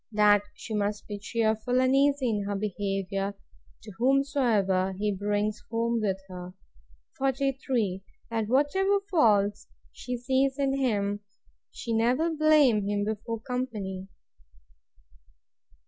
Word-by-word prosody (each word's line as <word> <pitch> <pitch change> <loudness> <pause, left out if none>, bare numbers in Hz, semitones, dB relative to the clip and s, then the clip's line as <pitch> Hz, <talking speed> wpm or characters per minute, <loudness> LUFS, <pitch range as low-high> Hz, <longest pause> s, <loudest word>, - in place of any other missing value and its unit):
That 210 -1 +5
she 225 - -7
must 205 0 -1
be 205 -1 -6
cheerful 220 +3 0
and 260 +1 +3
easy 280 -1 +3
in 210 -3 -1
her 200 0 -2
behaviour, 195 -1 -2 0.5
to 215 - -9
whomsoever 235 -8 +2
he 205 +2 -1
brings 205 +2 -1
home 230 0 0
with 195 -3 0
him. 180 0 -9 0.6
43. 265 -7 0 0.3
That 225 -2 -1
whatever 340 - +2
faults 210 - +3 0.2
she 250 0 -5
sees 265 +2 +1
in 275 -1 +1
him, 205 -5 0 0.5
she 230 - -5
never 250 +9 +2
blame 295 -9 +4
him 205 0 0
before 220 +1 -4
company. 215 -7 -4
220 Hz, 115 wpm, -28 LUFS, 205-260 Hz, 0.6 s, That